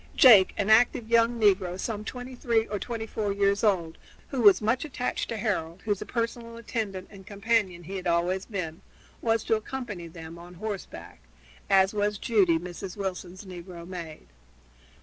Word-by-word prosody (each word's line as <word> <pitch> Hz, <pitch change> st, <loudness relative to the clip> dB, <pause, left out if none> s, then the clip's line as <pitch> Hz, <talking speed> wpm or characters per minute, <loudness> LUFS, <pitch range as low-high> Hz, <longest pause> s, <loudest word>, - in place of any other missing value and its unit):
Jake, 215 Hz, -8 st, +8 dB
an 200 Hz, +2 st, +1 dB
active 230 Hz, 0 st, +4 dB
young 230 Hz, 0 st, +4 dB
negro 190 Hz, -4 st, +2 dB
some 215 Hz, -1 st, -3 dB
twenty 250 Hz, +3 st, -7 dB
three 230 Hz, -2 st, +1 dB
or 205 Hz, -2 st, -4 dB
twenty 230 Hz, 0 st, -4 dB
four 215 Hz, -2 st, -2 dB
years 200 Hz, +1 st, +1 dB
old, 175 Hz, -6 st, +1 dB, 0.3 s
who 265 Hz, -, -2 dB
was 200 Hz, -4 st, +7 dB
much 225 Hz, +4 st, 0 dB
attached 255 Hz, -5 st, -3 dB
to 230 Hz, -, -3 dB
Harold, 190 Hz, -5 st, -2 dB
whose 205 Hz, -3 st, -1 dB
personal 230 Hz, -1 st, -3 dB
attendant 210 Hz, -5 st, -4 dB
and 195 Hz, -2 st, -12 dB
companion 200 Hz, -4 st, 0 dB
he 190 Hz, +4 st, -6 dB
had 185 Hz, -1 st, -4 dB
always 175 Hz, +3 st, +1 dB
been, 175 Hz, -7 st, -5 dB, 0.4 s
was 225 Hz, -1 st, +1 dB
to 225 Hz, -, +2 dB
accompany 215 Hz, -6 st, -6 dB
them 165 Hz, 0 st, -10 dB
on 175 Hz, +1 st, -12 dB
horseback, 205 Hz, -, -7 dB, 0.5 s
as 190 Hz, 0 st, +5 dB
was 205 Hz, 0 st, 0 dB
Judy, 195 Hz, -7 st, +3 dB
Mrs. 180 Hz, +3 st, -7 dB
Wilson's 185 Hz, -1 st, -5 dB
negro 175 Hz, -2 st, -9 dB
maid. 170 Hz, -4 st, -8 dB
200 Hz, 165 wpm, -27 LUFS, 180-225 Hz, 0.5 s, Jake